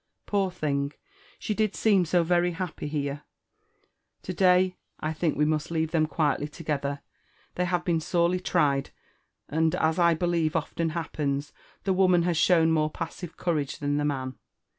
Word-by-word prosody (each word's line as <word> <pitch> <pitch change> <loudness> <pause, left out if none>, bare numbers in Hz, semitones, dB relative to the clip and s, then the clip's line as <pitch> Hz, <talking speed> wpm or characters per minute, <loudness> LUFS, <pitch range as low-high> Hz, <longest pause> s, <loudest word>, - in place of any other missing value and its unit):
Poor 200 -2 +1
thing! 145 -5 -2 0.4
she 215 - -2
did 215 -1 0
seem 200 -5 +3
so 175 +1 +2
very 175 +1 +2
happy 170 -3 -4
here! 145 -1 -3 1.0
To 185 - -4
day 185 0 +3 0.2
I 155 +1 -2
think 160 0 -1
we 150 - +3
must 155 0 0
leave 160 -1 -1
them 155 -2 +2
quietly 150 -2 0
togethet^^ 145 -3 -3 0.5
fheyhave 180 -1 0
Iwea 170 -2 +2
aorely 175 +3 +1
tried, 140 -7 +1 0.6
and, 160 +2 +1
as 160 +2 +1
1 170 -2 +4
believe 170 -2 0
often 165 +1 -1
happens^ 145 -4 -2 0.3
the 195 - +1
wo 190 0 +4
man 175 -2 +4
has 175 -1 +1
shown 165 0 +4
more 155 -1 +2
passive 170 +2 -7
courage 150 -6 -1
than 145 0 -1
the 145 - 0
man. 130 -3 -3
165 Hz, 160 wpm, -27 LUFS, 150-180 Hz, 1.0 s, 1